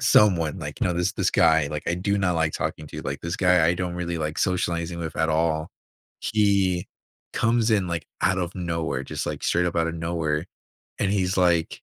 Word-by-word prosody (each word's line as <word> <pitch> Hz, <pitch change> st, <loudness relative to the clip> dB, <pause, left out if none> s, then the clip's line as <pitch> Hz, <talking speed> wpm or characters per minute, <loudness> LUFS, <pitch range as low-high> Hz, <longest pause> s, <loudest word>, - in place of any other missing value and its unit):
someone, 95 Hz, -, +4 dB
like -, -, -7 dB
you -, -, +2 dB
know, -, -, +1 dB
this 90 Hz, 0 st, 0 dB
this -, -, +1 dB
guy, 80 Hz, -2 st, +4 dB
like, 75 Hz, +1 st, -5 dB
I 85 Hz, -, +1 dB
do 100 Hz, +3 st, 0 dB
not 90 Hz, -3 st, +1 dB
like 80 Hz, -1 st, +1 dB
talking 75 Hz, -, -3 dB
to -, -, -9 dB
you. 75 Hz, -, -5 dB
Like, 70 Hz, 0 st, -4 dB
this 85 Hz, +1 st, -3 dB
guy, 90 Hz, -3 st, +4 dB
I 85 Hz, -, +3 dB
don't 90 Hz, -1 st, -3 dB
really 85 Hz, -1 st, -3 dB
like 75 Hz, 0 st, -3 dB
socializing 85 Hz, -2 st, -1 dB
with 80 Hz, -2 st, -5 dB
at 80 Hz, +1 st, +1 dB
all. 80 Hz, 0 st, 0 dB, 0.5 s
He 100 Hz, -4 st, +2 dB, 0.5 s
comes 115 Hz, 0 st, +2 dB
in, 100 Hz, -4 st, +2 dB
like, 85 Hz, -3 st, -3 dB, 0.2 s
out 95 Hz, +1 st, +2 dB
of 90 Hz, 0 st, -3 dB
nowhere, 85 Hz, -3 st, -2 dB
just, -, -, -4 dB
like, -, -, -4 dB
straight 90 Hz, +1 st, +2 dB
up 85 Hz, -, -2 dB
out 80 Hz, -, +2 dB
of 85 Hz, -, -3 dB
nowhere, 80 Hz, -1 st, -2 dB, 0.5 s
and 95 Hz, -, +1 dB
he's 95 Hz, -2 st, 0 dB
like, 85 Hz, -3 st, +2 dB
85 Hz, 220 wpm, -25 LUFS, 80-90 Hz, 0.5 s, someone